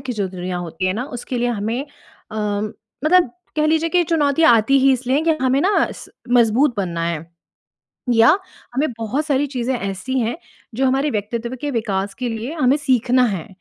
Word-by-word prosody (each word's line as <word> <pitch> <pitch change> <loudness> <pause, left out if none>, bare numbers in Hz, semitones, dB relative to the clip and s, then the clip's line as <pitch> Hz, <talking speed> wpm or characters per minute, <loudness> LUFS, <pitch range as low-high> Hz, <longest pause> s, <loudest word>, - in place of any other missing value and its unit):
की 265 -2 -4
जो 205 -3 -1
दुनिया 180 0 -5
होती 175 +1 -3
है 185 - +1
ना, 240 +5 -3
उसके 245 -1 -5
लिए 245 +1 +1
हमें 225 +2 -2 0.5
अ, 220 - -7 0.7
मतलब 345 -5 +4 0.3
कह 305 0 +2
लीजिए 320 +1 +2
कि 360 -1 +3
चुनौतियाँ 315 -2 +3
आती 270 +6 +3
ही 270 0 +5
इसलिए 260 +1 0
हैं 315 - 0
कि 330 - +3
हमें 260 +2 +3
ना 390 +3 +2
स - - -11 0.2
मज़बूत 240 +3 +4
बनना 170 -4 -2
है 165 -1 -3 0.9
या 230 +11 +6 0.4
हमें 295 +4 +1
बहुत 255 +7 -2
सारी 290 -1 +1
चीज़ें 260 -1 -2
ऐसी 200 +7 -3
हैं, 235 +4 -1 0.4
जो 265 +2 +1
हमारे 270 +3 +1
व्यक्तित्व 230 +3 -3
के 290 - -2
विकास 200 -5 -2
के 250 -1 -3
लिए 230 +5 -4
हमें 270 -3 +3
सीखना 255 -3 +2
है। 190 -8 -3
250 Hz, 190 wpm, -20 LUFS, 215-280 Hz, 0.9 s, या